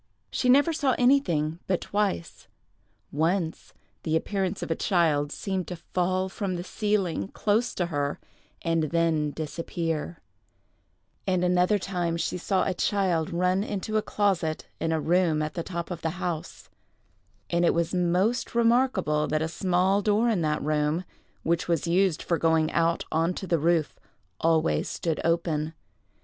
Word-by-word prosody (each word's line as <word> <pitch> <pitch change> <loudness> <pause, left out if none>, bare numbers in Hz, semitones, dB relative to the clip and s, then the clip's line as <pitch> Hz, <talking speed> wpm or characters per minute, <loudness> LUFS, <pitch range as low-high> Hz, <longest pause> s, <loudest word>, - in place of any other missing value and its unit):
She 250 - 0
never 285 +6 +5
saw 275 -5 +1
anything 175 - +2
but 185 -2 +1
twice; 205 - -2 0.6
once, 165 +2 -1 0.3
the 160 -1 -1
appearance 190 +2 -1
of - - -4
a - - +2
child 155 -6 +1
seemed 190 -1 -3
to 180 - -5
fall 185 +2 -1
from 190 -1 -3
the 175 - -4
ceiling, 195 - -1
close 220 - 0
to 175 - 0
her, 145 -4 -2 0.4
and 165 -2 +1
then 160 -1 +1
disappear; 165 +1 -4 1.1
and 185 -2 +1
another 180 +3 +3
time 175 -3 -2
she 180 - -2
saw 190 +2 +1
a 190 - 0
child 180 -4 0
run 180 +3 +1
into 210 +1 -4
a 215 - +3
closet 185 -8 0
in 165 - -1
a 160 - +1
room 165 -2 +2
at 155 - -4
the 170 - -3
top 170 0 -5
of 170 -2 -5
the 160 - 0
house; 175 -4 -5 0.8
and 170 0 +2
it 170 - +3
was 170 +1 0
most 180 +8 +1
remarkable 235 -11 +2
that 155 0 0
a - - 0
small 185 +3 +1
door 215 +3 +2
in 210 -6 +1
that 155 -1 0
room, 150 +3 0 0.4
which 170 0 0
was 170 -4 0
used 180 0 +2
for 170 -3 0
going 160 0 +2
out 170 0 +1
on 165 +3 +1
to - - -5
the 170 -3 +1
roof, 165 -1 +1 0.4
always 165 -1 +2
stood 165 -2 -2
open. 160 -2 0
175 Hz, 160 wpm, -27 LUFS, 160-190 Hz, 1.1 s, never